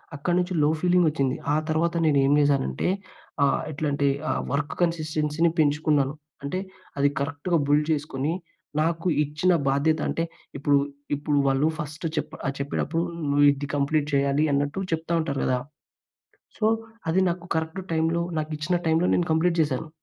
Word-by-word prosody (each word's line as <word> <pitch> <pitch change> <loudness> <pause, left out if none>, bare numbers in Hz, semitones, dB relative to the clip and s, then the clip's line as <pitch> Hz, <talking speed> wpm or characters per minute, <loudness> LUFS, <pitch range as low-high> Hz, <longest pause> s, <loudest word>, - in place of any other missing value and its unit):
అక్కడి 175 +5 0
నుంచి 180 +1 -1
లో - - +5
ఫీలింగ్ 180 +1 +3
వచ్చింది. 140 -4 0 0.2
ఆ - - +3
తర్వాత 165 +1 +1
నేను 150 -2 +3
ఏం 140 - +4
చేశానంటే 140 - +1 0.6
ఆహ్, 140 - +2
ఎట్లంటే 145 -1 0 0.2
ఆహ్, - - 0
వర్క్ 145 0 -1
కన్‌సిస్టెన్సీ 155 -1 +1
పెంచుకున్నాను. 145 -2 +2 0.3
అంటే 140 +6 -2 0.4
అది 140 0 +4
కరెక్ట్‌గా 160 +4 -1
బుల్డ్ 150 +1 +3
చేసుకొని 145 0 -1 0.5
నాకు 165 +2 0 0.2
ఇచ్చిన 150 +5 +1 0.2
బాధ్యత, 150 +3 +2
అంటే 165 - -1 0.3
ఇప్పుడు, 145 0 +3 0.4
ఇప్పుడు 145 0 -1
వాళ్ళు 135 +3 +3
ఫస్ట్ 150 0 -6
చెప్ 150 +1 -2 0.3
చెప్పేటప్పుడు 155 +4 -1 0.3
నువ్వు 145 +1 +4
ఇది 140 0 -4
కంప్లీట్ 145 +1 +1
చేయాలి 140 +1 +2
అన్నట్టు 145 +6 0
చెప్తా 165 +1 -1
ఉంటారు 140 -4 -2
కదా! 130 - +2 1.0
సో, 215 - -2 0.5
అది 180 +4 +3
నాకు 175 0 -5
కరెక్ట్ 160 +4 -2
టైమ్‌లో, 165 +1 +1 0.2
నాకు 155 0 -3
ఇచ్చిన 155 +4 -1
టైమ్‌లో 160 +3 +3
నేను 175 - +1
కంప్లీట్ 170 +2 +2
చేశాను. 150 0 0
150 Hz, 150 wpm, -25 LUFS, 140-165 Hz, 1.0 s, లో